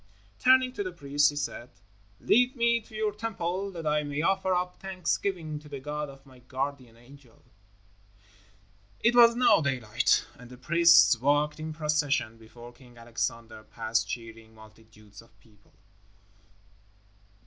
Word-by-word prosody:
Turning 260 0 +4
to 205 - -5
the 185 -2 -4
priest, 145 -3 +1
he 145 - -7
said, 145 -4 -5 0.5
"Lead 250 +3 +2
me 235 -1 +2
to 220 0 -16
your 215 -1 -1
Temple 200 -3 -4
that 165 -3 -8
I 150 0 +1
may 145 +1 -4
offer 190 +1 0
up 180 0 -1
thanksgiving 180 -4 -3
to 150 0 -16
the 140 -2 -7
God 150 +1 -5
of 135 0 -15
my 130 -2 -18
guardian 130 -1 -6
angel." 125 0 -19 1.6
It 235 +1 +3
was 235 -1 +7
now 250 -8 +4
daylight, 125 -7 0
and 125 -1 -13
the 125 - -12
priests 170 -3 +5
walked 145 +3 +1
in 155 0 -5
procession 150 -7 -1
before 120 +2 -14
King 120 -1 -19
Alexander 115 -1 -5
past 115 +1 -2
cheering 115 -1 -8
multitudes 110 -1 -17
of 115 -3 -25
people. 105 -1 -27
145 Hz, 145 wpm, -27 LUFS, 120-180 Hz, 1.6 s, was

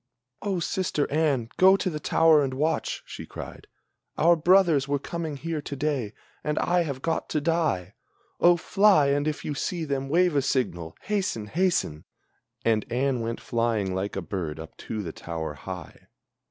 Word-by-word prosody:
"O, 195 -3 -1
sister 170 -3 0
Anne, 140 -7 +1
go 190 +1 +7
to 195 - -2
the 155 -4 -2
tower 160 0 +4
and 130 -1 -2
watch!" 155 +4 -1
she - - -8
cried, - - -9 0.5
"Our 170 +2 +5
brothers 170 -4 +4
Were 145 0 +1
coming 160 +1 -5
here 160 +1 -3
to 145 - -6
day, 135 -7 -1 0.3
and 150 0 -1
I 175 0 +2
have 140 -5 -4
got 165 -1 -1
to 150 - 0
die! 150 - 0 0.5
Oh, 175 0 +6
fly, 185 -4 +4
and 145 +1 +1
if 155 - -3
you 150 - -2
see 165 +3 -2
them, 135 -2 -2
wave 175 +1 +3
a 140 - +4
signal! 85 -12 -1
Hasten! 190 - -1
hasten!" 160 - 0 0.6
And 110 -2 +3
Anne 130 +1 +1
went 115 0 -3
flying 115 -5 0
like 95 +2 -3
a 95 - -3
bird 80 -3 -4
up 80 0 -9
to 110 -2 -5
the 85 - -6
tower 80 -2 -5
high. 90 +5 -9
145 Hz, 175 wpm, -26 LUFS, 110-165 Hz, 0.6 s, go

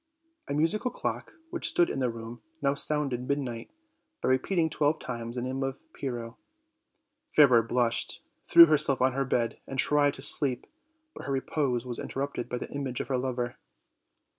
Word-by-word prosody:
A 140 - -2
musical 165 +11 +1
clock, - - -4 0.2
which 345 - 0
stood 175 - +3
in - - -3
the 125 -2 +1
room, 115 0 -8 0.2
now 140 -2 +1
sounded 140 -4 -1
midnight, 130 -5 -3 0.5
by - - -1
repeating 160 +6 +2
twelve 150 0 +1
times 120 -1 -6
the 120 - -3
name 130 +1 -3
of 135 0 -2 0.2
Pyrrho. 120 -3 -5 1.0
Fairer 130 -6 +7
blushed, 120 0 -1 0.3
thew 170 0 +10
herself 150 -4 +3
on 130 0 +3
her 135 +1 0
bed 120 -2 -1
and 135 - -6
tried 145 +1 +3
to 135 - -5
sleep, 135 -4 +2 0.5
but - - -9
her - - -2
repose 130 -2 -1
was 120 -2 -5
interrupted 135 -3 -4
by 125 - -2
the - - -7
image 135 -3 -4
of - - -4
her 130 - +1
lover. 125 -1 -3
130 Hz, 170 wpm, -28 LUFS, 120-145 Hz, 1.0 s, thew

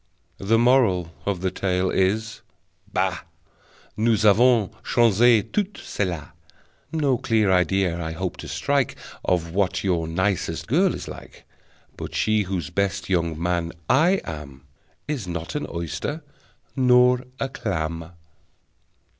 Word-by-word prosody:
The 110 +4 +2
Moral 115 -9 +3 0.2
of 95 -3 -1
the 95 -1 0
tale 95 -1 0
is: 110 +4 0 0.5
Bah! - - 0 0.8
Nous 110 -1 +2
avons 110 0 +4
changé 115 -1 +4
tout 205 -1 -1
celà. 90 - -4 0.6
No 145 -6 +1
clear 110 -4 +2
idea 90 -1 +2
I 80 0 -4
hope 90 +2 -4
to - - -8
strike 140 -3 0 0.3
Of 85 -2 0
what 95 -1 0
your 85 -4 0
nicest 95 +3 -1
girl - - +2
is - - -7
like, - - -11 0.5
But - - -7
she 110 0 +2
whose 90 -3 -3
best 100 0 -1
young 85 -3 0
man 85 -1 -1
I 165 +9 +4
am 70 -4 -8 0.4
Is 140 -10 -3
not 85 0 -5
an 150 - -3
oyster, 85 - -4 0.5
nor 125 -1 +4 0.2
a 135 - 0
clam! 85 -9 -4
95 Hz, 130 wpm, -24 LUFS, 85-120 Hz, 0.8 s, avons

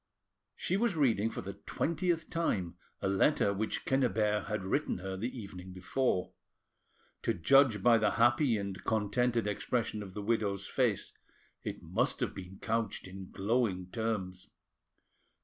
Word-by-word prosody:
She 185 - 0
was 230 -3 +1
reading 115 -8 +3
for - - -5
the 100 +1 -6
twentieth 170 0 0
time 100 - 0 0.3
a - - +2
letter 100 +2 +3
which 110 +2 -2
Quenriebert 110 -5 +1
had 105 -3 -2
written 95 - 0
her 95 +1 -5
the 110 +6 -2
evening 95 -6 -8
before. 95 +2 0 0.9
To - - 0
judge 120 - +5
by 115 -2 +6
the 105 - +2
happy 120 +1 +4
and 100 -1 -5
contented 115 +2 +1
expression 110 +1 -1
of 95 -2 -9
the 105 - -4
widow's 100 -3 0
face, - - 0 0.5
it - - -6
must - - 0
have - - -1
been 95 0 -9
couched 115 -4 -1
in 95 0 -9
glowing 100 -3 0
terms. 100 -6 -3
105 Hz, 145 wpm, -32 LUFS, 95-120 Hz, 0.9 s, by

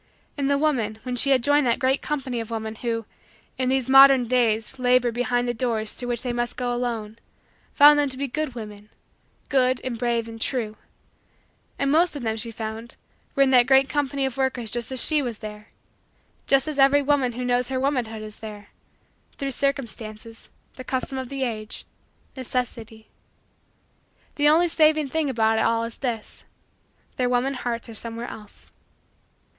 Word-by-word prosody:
And 280 -2 -1
the 280 - +3
woman 250 -8 0
when 250 -1 -3
she 275 +3 +2
had 260 -3 +3
joined 290 -1 +3
that 235 - +2
great 265 +2 +1
company 265 -5 -3
of 225 -1 -6
women, 220 -1 -4
who, 230 0 -3 0.5
in 255 -1 +1
these 265 -2 +1
modern 270 -2 +7
days 235 0 0
labor 250 -1 +3
behind 245 +1 0
the 240 - 0
doors 225 -3 -1
through 245 - -6
which 240 -1 -2
they 245 -2 -2
must 240 0 -2
go 245 -1 -1
alone, 230 -3 -4 0.5
found 295 0 +7
them 290 -1 +1
to 260 - -5
be 280 +1 -2
good 295 0 -3
women 210 -2 -9 0.6
good 255 -1 +2
and 240 -3 -4
brave 235 -2 0
and 225 0 -10
true. 225 -5 -2 1.0
And 275 0 0
most 335 +2 +3
of 280 - -6
them, 220 -1 -1
she 230 +1 -1
found, 225 +1 -7 0.4
were 275 - +5
in 265 - +2
that 250 -1 +5
great 270 0 +5
company 280 -1 -1
of 265 -2 -4
workers 255 -4 -1
just 240 +1 -2
as 260 -2 +2
she 305 -2 +3
was 240 -5 -4
there 210 0 -9 0.8
just 275 +1 +3
as 300 -2 -3
every 280 +1 +5
woman 275 -3 +1
who 250 +1 -4
knows 245 0 +1
her 260 -1 -1
womanhood 245 -6 -1
is 215 0 -9
there 210 -2 -9 0.7
through 275 -2 -3
circumstances, 230 -5 -4 0.3
the 255 - -7
custom 260 +1 -2
of 260 -2 -6
the 275 -1 -3
age, 215 -4 -5 0.5
necessity. 230 -4 -5 1.2
The 295 0 +3
only 335 +3 +4
saving 310 -3 +3
thing 315 0 -1
about 225 -3 +2
it - - +2
all 230 0 +1
is 230 0 -6
this: 235 -5 -5 0.7
their 250 -1 +1
woman 250 +2 +1
hearts 240 -2 -4
are 230 - -9
somewhere 230 +2 -5
else. 210 -1 -12
245 Hz, 180 wpm, -24 LUFS, 230-270 Hz, 1.2 s, modern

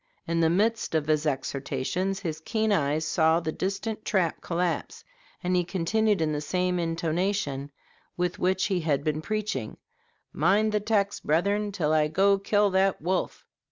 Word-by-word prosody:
In 165 0 0
the 165 -1 +4
midst 215 +1 +1
of 155 -2 +1
his 155 0 +1
exhortations 145 +7 -2
his 160 -4 -4
keen 220 +1 0
eyes 155 -4 +1
saw 160 +1 +3
the 160 -2 -3
distant 200 +5 -3
trap 185 -6 0
collapse, 175 -1 -2 0.4
and 180 +1 +1
he 180 - +3
continued 200 +3 +1
in 155 -1 +1
the 150 -1 -2
same 180 +3 0
intonation 165 -3 -1 0.5
with 180 0 -1
which 185 +1 +1
he 190 -3 0
had 145 -4 0
been 155 0 -1
preaching, 210 - -3 0.6
"Mind 200 +7 +3
the 210 - +1
text, 205 -1 0
brethren, 200 +7 +1
till 155 -6 0
I 155 -1 +3
go 195 +5 +3
kill 205 0 +2
that 190 0 +2
wolf!" 185 +3 -2
180 Hz, 160 wpm, -27 LUFS, 155-200 Hz, 0.6 s, the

